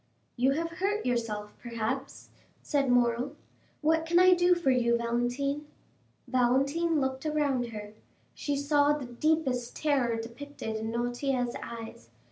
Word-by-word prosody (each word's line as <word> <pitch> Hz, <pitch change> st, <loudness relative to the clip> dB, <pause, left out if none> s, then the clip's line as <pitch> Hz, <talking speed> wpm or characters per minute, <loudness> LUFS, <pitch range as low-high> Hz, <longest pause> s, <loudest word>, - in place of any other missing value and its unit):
"You 265 Hz, +2 st, +3 dB
have 330 Hz, +3 st, -2 dB
hurt 410 Hz, +3 st, 0 dB
yourself, 225 Hz, -4 st, -2 dB
perhaps," 230 Hz, -2 st, -4 dB, 0.3 s
said 280 Hz, -3 st, +1 dB
Morrel. 245 Hz, +3 st, +2 dB, 0.5 s
"What 320 Hz, +1 st, +2 dB
can 345 Hz, +1 st, +3 dB
I 365 Hz, +1 st, +7 dB
do 355 Hz, 0 st, +4 dB
for 340 Hz, -6 st, +2 dB
you, 235 Hz, -2 st, +3 dB
Valentine?" 245 Hz, +5 st, -1 dB, 0.6 s
Valentine 275 Hz, +6 st, +2 dB
looked 265 Hz, -1 st, -2 dB
around 290 Hz, -5 st, 0 dB
her; 210 Hz, -2 st, -8 dB, 0.4 s
she 290 Hz, -, -2 dB
saw 290 Hz, +1 st, +3 dB
the 295 Hz, -3 st, -4 dB
deepest 250 Hz, -1 st, 0 dB
terror 270 Hz, -6 st, +1 dB
depicted 235 Hz, 0 st, -6 dB
in 220 Hz, +1 st, -3 dB
Noirtier's 245 Hz, +1 st, -1 dB
eyes. 225 Hz, -, -8 dB
260 Hz, 130 wpm, -29 LUFS, 235-295 Hz, 0.6 s, I